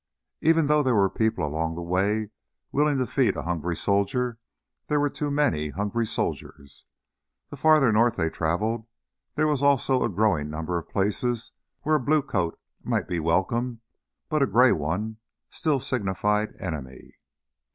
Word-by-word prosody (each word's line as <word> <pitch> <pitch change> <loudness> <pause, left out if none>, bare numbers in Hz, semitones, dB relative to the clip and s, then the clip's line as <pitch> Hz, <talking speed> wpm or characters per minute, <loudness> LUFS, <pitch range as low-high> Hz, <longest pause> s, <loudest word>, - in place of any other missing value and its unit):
Even 165 0 +4
though 150 +1 +3
there 130 -4 +2
were 100 -2 +3
people 110 -7 0
along 80 +2 -2
the 85 - -5
way 100 +5 0 0.4
willing 145 0 +2
to 130 - +1
feed 130 0 +1
a - - -4
hungry 85 0 -2
soldier, 115 +6 0 0.5
there 150 -1 +1
were 145 -1 +1
too 150 - -3
many 140 - +1
hungry 105 +7 -2
soldiers. 70 -8 -4 0.7
The - - -6
farther 155 -6 +5
north 115 +2 +3
they 80 -3 -1
traveled 110 +8 -1 0.5
there 155 - +2
was 150 -3 +1
also 135 -2 +3
a - - +1
growing 95 -7 +1
number 80 +3 -2
of 80 - -13
places 110 +4 -1 0.3
where 155 0 +3
a - - -3
blue 145 +3 +2
coat 90 -10 -2 0.2
might - - -1
be 85 - -2
welcome, 110 +9 0 0.5
but 155 -2 0
a 135 - +4
gray 120 +5 +5
one 95 +9 -2 0.3
still 155 -5 0
signified 105 -2 -1
"enemy." 75 -8 -7
110 Hz, 160 wpm, -25 LUFS, 85-135 Hz, 0.7 s, farther